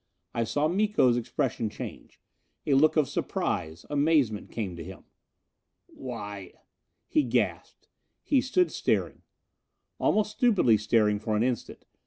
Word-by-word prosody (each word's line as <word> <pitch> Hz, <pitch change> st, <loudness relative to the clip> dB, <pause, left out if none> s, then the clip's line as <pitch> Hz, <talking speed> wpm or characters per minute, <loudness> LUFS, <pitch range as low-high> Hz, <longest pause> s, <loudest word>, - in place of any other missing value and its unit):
I 115 Hz, -, 0 dB
saw 145 Hz, +6 st, 0 dB
Miko's 190 Hz, -, +2 dB
expression 115 Hz, -1 st, -2 dB
change. -, -, -9 dB, 0.5 s
A 145 Hz, -, +2 dB
look 150 Hz, +4 st, +4 dB
of 150 Hz, -3 st, +3 dB
surprise, 80 Hz, -1 st, -3 dB
amazement 145 Hz, -7 st, +1 dB
came 100 Hz, -6 st, -4 dB
to 85 Hz, -, -7 dB
him. -, -, -10 dB, 0.8 s
"Why 105 Hz, -7 st, -8 dB, 0.3 s
" -, -, -52 dB
He 310 Hz, -, +2 dB
gasped. -, -, -2 dB, 0.4 s
He 275 Hz, -3 st, +3 dB
stood 355 Hz, +8 st, +1 dB
staring. -, -, -1 dB, 0.8 s
Almost 210 Hz, 0 st, +2 dB
stupidly 210 Hz, -, +3 dB
staring 105 Hz, -1 st, +2 dB
for 110 Hz, 0 st, -2 dB
an 110 Hz, -, +2 dB
instant. 125 Hz, -2 st, -3 dB
125 Hz, 130 wpm, -27 LUFS, 105-165 Hz, 0.8 s, look